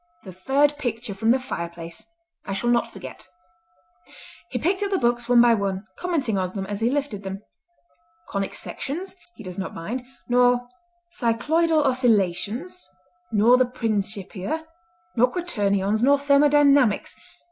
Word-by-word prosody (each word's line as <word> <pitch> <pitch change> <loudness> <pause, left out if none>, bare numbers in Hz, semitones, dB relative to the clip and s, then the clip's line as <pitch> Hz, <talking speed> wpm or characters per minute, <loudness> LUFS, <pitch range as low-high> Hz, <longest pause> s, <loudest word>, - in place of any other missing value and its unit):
"The 185 - -9
third 280 +10 +1
picture 235 -5 -3
from 220 +3 -1
the 255 +3 +4
fireplace; 170 -8 -6 0.4
I 195 - -2
shall 240 +5 0
not 235 -1 +1
forget." 130 -1 -10 1.2
He 250 - -3
picked 365 - 0
up 405 - 0
the 390 - +1
books 240 -2 0
one 245 -1 +6
by 235 0 +6
one, 195 -2 -2
commenting 280 - -1
on 185 0 -2
them 195 -2 -4
as 205 +1 -4
he 230 +1 +2
lifted 275 -7 -2
them. 195 +1 -6 0.9
"Conic 195 -1 -3
Sections 355 +8 -5 0.2
he 225 - -11
does 185 -1 -6
not 190 - -5
mind, 230 +10 -4 0.2
nor 245 0 +3 0.5
Cycloidal 305 +7 +2
Oscillations, 240 - 0 0.4
nor 225 +3 +5
the 255 - +4
Principia, 215 - -3 0.5
nor 250 +1 +4
Quaternions, 205 - 0
nor 280 +3 +5
Thermodynamics. 280 -4 +4
240 Hz, 140 wpm, -24 LUFS, 200-280 Hz, 1.2 s, one